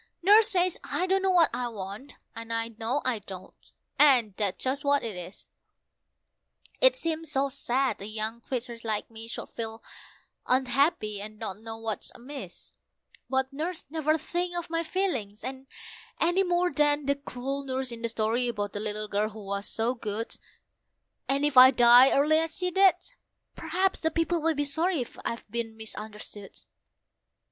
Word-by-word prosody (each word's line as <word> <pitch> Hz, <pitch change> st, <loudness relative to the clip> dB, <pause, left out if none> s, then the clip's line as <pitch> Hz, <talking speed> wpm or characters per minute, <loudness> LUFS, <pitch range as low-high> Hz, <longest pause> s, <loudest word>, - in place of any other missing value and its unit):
Nurse 420 Hz, +3 st, +7 dB
says 365 Hz, -3 st, +1 dB
I 365 Hz, -, -1 dB
don't 385 Hz, +1 st, +2 dB
know 385 Hz, -, +1 dB
what 350 Hz, -4 st, +5 dB
I 245 Hz, -, -2 dB
want, 205 Hz, +4 st, -7 dB, 0.2 s
and 230 Hz, 0 st, -7 dB
I 230 Hz, 0 st, -1 dB
know 230 Hz, +5 st, -2 dB
I 250 Hz, -4 st, 0 dB
don't, 190 Hz, -2 st, -12 dB, 0.3 s
and 255 Hz, -8 st, +6 dB
that's 200 Hz, -3 st, -1 dB
just 270 Hz, +3 st, -1 dB
what 285 Hz, 0 st, +2 dB
it 225 Hz, -4 st, -4 dB
is. 180 Hz, +2 st, -9 dB, 1.3 s
It -, -, +6 dB
seems 325 Hz, -, -3 dB
so 275 Hz, -1 st, +1 dB
sad 260 Hz, -4 st, -1 dB
a 200 Hz, -, -5 dB
young 220 Hz, +2 st, -4 dB
creature 240 Hz, -2 st, -5 dB
like 220 Hz, 0 st, -2 dB
me 225 Hz, 0 st, -9 dB
should 230 Hz, -, -6 dB
feel 225 Hz, 0 st, -6 dB, 0.6 s
unhappy, 255 Hz, -4 st, +1 dB
and 215 Hz, +1 st, -8 dB
not 210 Hz, -3 st, -5 dB
know 225 Hz, 0 st, -7 dB
what's 225 Hz, -3 st, -4 dB
amiss; 245 Hz, -8 st, -9 dB, 0.6 s
But 265 Hz, +1 st, 0 dB
Nurse 320 Hz, +4 st, -4 dB
never 310 Hz, -1 st, +1 dB
thinks 350 Hz, +2 st, -3 dB
of 345 Hz, -1 st, -5 dB
my 330 Hz, 0 st, +1 dB
feelings, 290 Hz, -, -2 dB, 0.7 s
any 350 Hz, +3 st, +3 dB
more 355 Hz, -1 st, +1 dB
than 295 Hz, -1 st, +2 dB
the 280 Hz, -, +3 dB
cruel 275 Hz, 0 st, -5 dB
nurse 260 Hz, -1 st, -3 dB
in 230 Hz, -1 st, -8 dB
the 230 Hz, -, -1 dB
story 230 Hz, +2 st, 0 dB
about 205 Hz, -4 st, -3 dB
the 205 Hz, -, -3 dB
little 215 Hz, 0 st, -3 dB
girl 210 Hz, +1 st, 0 dB
who 215 Hz, -1 st, -10 dB
was 200 Hz, +1 st, -3 dB
so 230 Hz, +2 st, 0 dB
good, 225 Hz, -2 st, -4 dB, 0.9 s
And 275 Hz, +1 st, +2 dB
if 295 Hz, -3 st, 0 dB
I 255 Hz, +1 st, +11 dB
die 245 Hz, 0 st, +7 dB
early 305 Hz, +3 st, +4 dB
as 325 Hz, 0 st, -3 dB
she 360 Hz, 0 st, -1 dB
did, 385 Hz, 0 st, +6 dB, 0.6 s
perhaps 380 Hz, +1 st, 0 dB
then 320 Hz, -1 st, -1 dB
people 330 Hz, 0 st, +1 dB
will 325 Hz, 0 st, +1 dB
be 290 Hz, -, 0 dB
sorry 315 Hz, 0 st, 0 dB, 0.2 s
I've 235 Hz, -, -4 dB
been 225 Hz, -1 st, -4 dB
misunderstood. 210 Hz, -2 st, -9 dB
255 Hz, 170 wpm, -28 LUFS, 220-315 Hz, 1.3 s, I